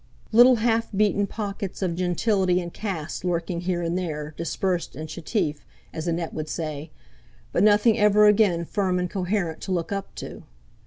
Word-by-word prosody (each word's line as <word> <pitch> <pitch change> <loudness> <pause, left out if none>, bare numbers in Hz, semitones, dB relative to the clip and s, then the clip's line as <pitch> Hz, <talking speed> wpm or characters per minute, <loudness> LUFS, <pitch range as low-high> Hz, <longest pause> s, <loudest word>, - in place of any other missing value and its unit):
Little 245 +3 +7
half 230 0 +1
beaten 205 0 +2
pockets 200 -2 -5
of 175 -3 -1
gentility 180 +1 +1
and 175 -1 -6
caste 175 -8 -4
lurking 170 -1 -1
here 175 -1 -1
and 170 +1 -1
there, 155 -4 -3
dispersed 175 0 -2
and 155 +3 -6
chetif, 155 -1 -2 0.4
as 160 +2 -4
Annette 170 -1 -2
would 155 0 -4
say; 155 -2 -4 0.6
but - - +1
nothing 215 +2 +4
ever 210 0 +5
again 200 -5 +4
firm 185 0 0
and 180 -1 -2
coherent 185 -3 -2
to 190 - -5
look 175 -1 -1
up 195 -1 -4
to. - - -8
180 Hz, 165 wpm, -25 LUFS, 170-205 Hz, 0.6 s, Little